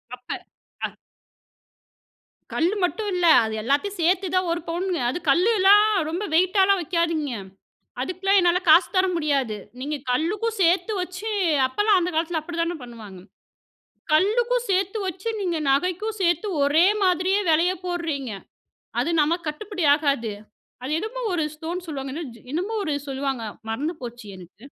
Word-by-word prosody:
அப்ப. 250 0 -32 0.6
அ. - - -5 1.6
கல்லு 345 +5 +1
மட்டும் 415 +4 -1
இல்ல. 355 -1 +1 0.2
அது 220 - -4
எல்லாத்தையும் 290 - 0
சேர்த்துதான் 365 +1 +1
1 340 +1 -1
பவுன்ங்க. 350 0 -1
அது 255 - -2
கல்லெல்லாம் 400 +5 +5 0.2
ரொம்ப 350 +6 -3
வெயிட்டால்லாம் 380 +3 +4
வைக்காதீங்க. 330 -4 -1 0.7
அதுக்கெல்லாம் 370 +8 +1
என்னால 350 0 +3
காசு 335 +3 +7
தர 370 +1 +4
முடியாது. 280 -8 0 0.2
நீங்க 295 +3 -3
கல்லுக்கும் 405 - -1
சேர்த்து 355 +4 +2
வச்சு 370 +4 -5 0.4
அப்பலாம் 410 +9 +2
அந்த 355 +1 -1
காலத்துல 320 0 0
அப்படித்தானே 335 +1 -3
பண்ணுவாங்க? 220 -6 -10 0.9
கல்லுக்கும் 480 +8 +2
சேர்த்து 385 +3 +1
வச்சு, 375 +3 -5
நீங்க 350 -4 -1
நகைக்கும் 365 +9 0
சேர்த்து 345 +2 +1 0.2
ஒரே 300 +5 +4 0.2
மாதிரியே 370 +2 +2
விலையை 335 +4 +3
போடுறீங்க. 325 -8 -3 0.7
அது 275 +7 0
நமக்கு 330 +2 -1
கட்டுப்படியாகாது. 300 - 0 0.5
அது 255 - -4
என்னமோ 445 +7 -5
ஒரு 325 -3 0
ஸ்டோன் 340 +4 -5
சொல்லுவாங்க. 275 -4 -5
என்ன 330 +2 -4
ஜோ 230 - -16
என்னமோ 370 +8 -2
ஒரு 305 -4 -1
சொல்லுவாங்க. 270 -3 -3 0.3
மறந்து 295 +10 -2
போச்சு 240 -2 -8
எனக்கு. 185 +5 -15
340 Hz, 135 wpm, -24 LUFS, 290-380 Hz, 1.6 s, காசு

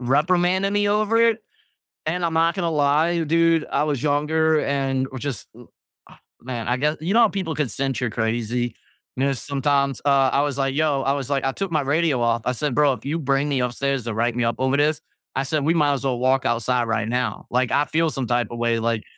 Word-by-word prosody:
reprimanding 175 +9 +1
me 205 0 +1
over 215 +2 +1
it, 230 -1 +3 0.7
and 175 +3 -2
I'm 165 - -1
not 165 +3 +2
gonna 170 -3 -1
lie, 155 +3 +2
dude, 165 0 +2
I - - +1
was 145 -5 -1
younger 155 +2 +2
and 135 -1 -1
which 130 +1 -7
is 135 -7 -4
uh - - -13 0.4
ah - - -18 0.2
man, 120 -2 -5
I 125 - +1
gue 150 +4 0
You 175 +5 -1
know 235 - +5
how 230 - +6
people 185 -7 -4
can 145 -6 -1
sense 135 -4 -2
you're 125 -2 -1
crazy? 120 +1 -2 0.4
And 135 - +1
then 140 - +1
sometimes, 140 0 -1
uh, 135 -2 +4
I 140 - +2
was 145 -2 -2
like, 135 -1 0
"Yo" 145 -2 +1
I 135 - +1
was 140 -2 -4
like, 140 -1 0
"I 135 - +1
took 195 +7 -4
my 155 -2 +1
radio 145 -2 +1
off," 115 -1 +1
I 125 - 0
said, 140 +2 -2
"Bro, 145 -2 +4
if 115 - -9
you 160 +4 -2
bring 140 0 0
me 135 -2 0
upstairs 130 0 -2
to 115 - -3
write 115 +2 0
me 120 - +1
up 115 - 0
over 130 +1 +1
this," 150 +1 +1 0.3
I 135 - 0
said, 145 +1 -1
"We 165 - +3
might 150 -3 +2
as 135 0 -4
well 125 -2 0
walk 130 +1 +1
outside 120 +1 0
right 115 -1 -1
now, 125 +1 -2
like, 125 0 0
I 145 - +2
feel 165 0 +1
some 135 -4 -3
type 120 0 +1
of 120 - -6
way, 115 -1 +1
like" 115 -1 -1
140 Hz, 240 wpm, -22 LUFS, 125-155 Hz, 0.7 s, how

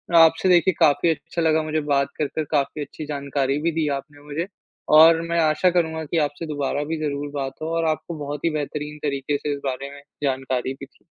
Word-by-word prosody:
आपसे 165 +3 +6
देखिए 180 +1 +5
काफ़ी 150 +3 +4
अच्छा 165 +2 -2
लगा 160 -1 +3
मुझे 155 0 -1
बात 140 0 +2
कर 150 - +1
कर, 155 - -3
काफ़ी 150 0 0
अच्छी 155 - -8
जानकारी 140 -1 -1
भी 170 +1 +1
दी 160 -1 0
आपने 145 +1 -12
मुझे। 160 +5 -3 0.5
और 165 +1 +7
मैं 170 0 +1
आशा 155 +3 +3
करूँगा 160 -2 0
कि 165 - -2
आपसे 145 +4 -8
दोबारा 145 -1 -1
भी 160 +2 -3
ज़रूर 145 0 -3
बात 135 -1 -3
हो 155 - -3
और 165 - +1
आपको 155 +2 -3
बहुत 145 +2 -4
ही - - +4
बेहतरीन 150 +1 -5
तरीके 140 0 -1
से 145 - -2
इस 140 - -5
बारे 135 +1 -3
में 140 - -12 0.2
जानकारी 130 -1 -1
भी 140 - -5
दी। - - -30
150 Hz, 215 wpm, -23 LUFS, 140-160 Hz, 0.5 s, और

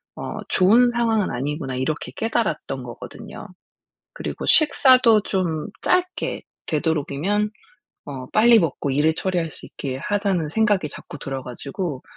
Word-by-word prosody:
어 - - -6
좋은 230 +7 +5
상황은 225 -4 +1
아니구나.' 135 +1 -3
이렇게 130 -1 -2
깨달았던 165 - -2
거 120 -1 -8
거든요. 125 - -10 0.7
그리고 - - -5
식사도 255 -7 +6
좀 175 -6 -2
짧게 365 0 0 0.3
되도록이면 160 +6 0 0.6
어 130 -3 -6
'빨리 230 +2 +6
먹고 155 -5 -1
일을 150 +4 +2
처리할 175 -2 -1
수 - - -8
있게 130 -2 -5
하자.'는 195 -6 0
생각이 205 -5 +2
자꾸 145 - -10
들어 135 -1 -5
가지고 135 +4 -5
170 Hz, 300 characters per minute, -22 LUFS, 140-215 Hz, 0.7 s, 식사도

